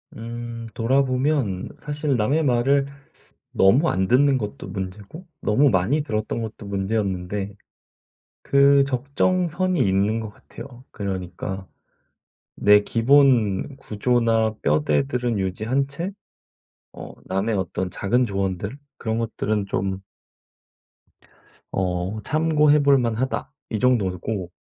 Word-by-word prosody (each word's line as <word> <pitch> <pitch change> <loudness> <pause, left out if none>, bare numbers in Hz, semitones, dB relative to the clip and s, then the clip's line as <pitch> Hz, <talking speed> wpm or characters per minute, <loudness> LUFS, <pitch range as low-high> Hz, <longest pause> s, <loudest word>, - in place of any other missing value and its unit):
음 115 0 -6
돌아보면 130 -4 0
사실 150 -1 -2
남의 130 +8 +1
말을 135 +2 +2 0.7
너무 125 - +4
안 95 0 0
듣는 135 +2 +4
것도 105 -3 -6
문제고 100 - -7
너무 135 +7 +3
많이 110 +11 +1
들었던 110 -4 -3
것도 110 -1 -7
문제였는데 100 -1 -2 0.9
그 140 0 +5
적정선이 175 +7 0
있는 100 +4 +1
것 110 -1 -5
같아요. 120 +4 -12
그러니까 95 -1 -5 0.9
내 105 0 +5
기본 125 -2 +3
구조나 115 -1 +1
뼈대들은 125 -6 +1
유지한 110 +9 -1
채 165 +7 -5 0.9
어 - - -8
남의 95 +4 -1
어떤 95 0 -2
작은 120 +7 +1
조언들 100 +2 -3 0.2
그런 110 -1 -3
것들은 110 -2 -1
좀 95 0 -2 1.7
어 90 +2 -2
'참고해 150 +1 +3
볼 140 -1 +5
만하다.' 120 +1 -2 0.2
이 110 - -2
정도고 100 -5 0
115 Hz, 225 characters per minute, -23 LUFS, 100-140 Hz, 1.7 s, 그